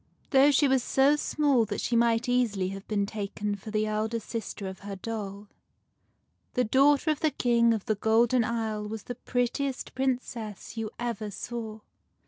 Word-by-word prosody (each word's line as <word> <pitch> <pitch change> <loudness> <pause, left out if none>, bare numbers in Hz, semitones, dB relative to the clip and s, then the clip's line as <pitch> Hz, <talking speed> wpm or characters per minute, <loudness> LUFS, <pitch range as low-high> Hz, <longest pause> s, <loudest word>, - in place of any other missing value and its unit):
¥ - - -40
T 270 - +5
HOUGH 285 +1 +6
she 285 - +4
was 265 -1 +3
so 270 +4 +4
small 290 -4 +2
that 205 -1 -4
she 240 - -1
might 235 +1 +3
easily 225 -7 +1
have 195 0 -8
been 205 -2 0
taken 205 0 -3
for 205 +2 -8
the 215 0 0
elder 215 +2 -1
sister 220 -2 -6
of 190 0 -7
her 200 0 -6
doll, 205 0 -6 1.1
the 250 - +3
daughter 280 +6 +4
of 305 - -2
the 315 - +2
King 235 -4 +3
of 220 -3 -1
the 215 - +2
Golden 225 +3 +3
Isle 220 -2 -2
was 215 -1 -6
the 245 - -5
prettiest 250 +2 -2
Princess 245 -6 -3
you 225 -1 -3
ever 230 -3 -3
saw. 220 +1 -6
230 Hz, 180 wpm, -28 LUFS, 210-250 Hz, 1.1 s, HOUGH